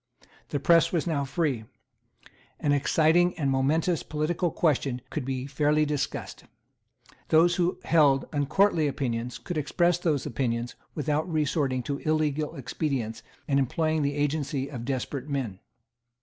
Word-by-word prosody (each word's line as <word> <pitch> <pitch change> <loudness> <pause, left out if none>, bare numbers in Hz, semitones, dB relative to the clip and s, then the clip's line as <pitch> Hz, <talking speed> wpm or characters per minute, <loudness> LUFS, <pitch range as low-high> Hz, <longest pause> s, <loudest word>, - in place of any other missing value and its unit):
The 145 - -1
press 165 +3 +4
was 170 -4 0
now 150 -5 0
free. 135 -5 -1 0.9
An 145 - +1
exciting 160 +5 +3
and 140 -4 0
momentous 155 +5 +1
political 165 +4 -1
question 140 -6 0
could 155 - -2
be 130 -1 -3
fairly 150 +2 +2
discussed. 150 -2 -3 0.8
Those 170 +2 +4
who 180 0 +1
held 145 -5 +4
uncourtly 155 +3 +2
opinions 125 -3 -2
could 175 -4 -4
express 175 +4 +1
those 155 -6 0
opinions 120 -3 -2 0.2
without 150 +2 -1
resorting 140 -4 0
to 140 0 -3
illegal 155 -1 0
expedients 125 -4 -3 0.3
and 140 -1 +2
employing 155 +4 0
the 140 0 0
agency 145 -1 -1
of 120 -4 -6
desperate 135 +1 -3
men. 125 -9 -3
145 Hz, 135 wpm, -27 LUFS, 135-160 Hz, 0.9 s, press